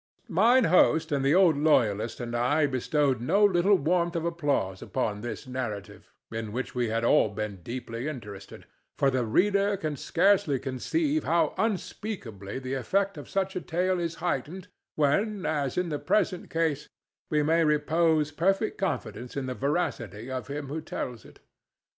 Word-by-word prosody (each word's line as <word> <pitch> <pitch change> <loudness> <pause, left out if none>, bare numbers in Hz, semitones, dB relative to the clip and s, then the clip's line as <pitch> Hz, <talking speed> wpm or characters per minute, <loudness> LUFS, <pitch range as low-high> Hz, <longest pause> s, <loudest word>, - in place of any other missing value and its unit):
Mine 230 +8 +5
host 160 -4 +4
and 140 -2 +1
the 140 +4 +3
old 180 -5 +5
loyalist 115 -8 +2
and 120 -1 -4
I 145 +6 +2
bestowed 135 -1 0
no 200 +12 +4
little 195 +1 +4
Warmth 175 +1 +1
of 165 0 -1
applause 145 - -1
upon 105 -5 -2
this 120 +3 -6
narrative, 120 -6 -6 0.2
in 110 -1 -4
which 125 +4 -4
we 120 -2 0
had 115 +1 -1
all 115 - +4
been 105 -1 -4
deeply 115 - -6
interested; 105 -9 -8 0.3
for 135 -1 +3
the 130 -1 0
reader 200 - +2
can 155 -4 -3
scarcely 180 -1 +2
conceive 290 - -1
how 170 +1 +2
unspeakably 180 - -4
the 130 0 -5
effect 195 +10 0
of 145 - -9
such 195 0 -1
a 185 - -2
tale 180 +3 0
is 170 -1 -2
heightened 180 +2 -3 0.3
when, 195 +8 +1
as 145 -3 -1
in 180 -1 0
the 150 -2 -2
present 185 -4 0
case, 160 -3 -1 0.4
we 150 -1 +2
may 165 +2 +3
repose 155 0 +2
perfect 195 +7 0
confidence 130 - -3
in 135 - -2
the 130 - -3
veracity 130 - -2
of 130 -1 -4
him 145 +1 -4
who 155 +4 -4
tells 125 -7 -6
it. - - -17
150 Hz, 165 wpm, -27 LUFS, 125-180 Hz, 0.4 s, Mine